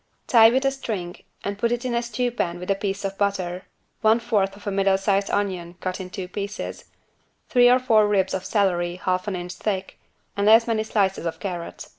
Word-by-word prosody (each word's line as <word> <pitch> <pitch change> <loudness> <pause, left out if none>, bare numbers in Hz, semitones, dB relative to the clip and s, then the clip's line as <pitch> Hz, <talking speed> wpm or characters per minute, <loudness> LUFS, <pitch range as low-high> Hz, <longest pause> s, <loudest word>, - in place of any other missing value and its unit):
Tie 225 -2 +7
with 260 +3 +1
a 270 - +3
string 200 -10 -5 0.3
and 200 0 -4
put 235 +2 +1
it 240 +1 -2
in 250 - -1
a 235 - +1
stewpan 235 -6 -2
with 180 +2 -3
a - - +3
piece 195 0 -3
of 195 0 -4
butter, 185 -3 -1 0.4
one 220 +2 +4
fourth 205 -5 0
of 205 - -15
a 205 - -1
middle 195 0 +2
sized 195 0 0
onion 185 -4 -2
cut 185 0 -4
in 185 - -7
two 185 0 -6
pieces, 200 +2 -6 0.6
three 245 -1 +6
or 250 - +6
four 225 -5 +3
ribs 195 -2 +1
of 190 - -2
celery 175 -5 0
half 185 +1 -2
an 200 - -1
inch 175 0 -5
thick 195 -3 -4 0.4
and 200 +1 +2
as 225 +1 +7
many 225 -2 0
slices 195 -5 0
of 165 - -5
carrot. 175 -4 -6
200 Hz, 210 wpm, -24 LUFS, 185-225 Hz, 0.6 s, Tie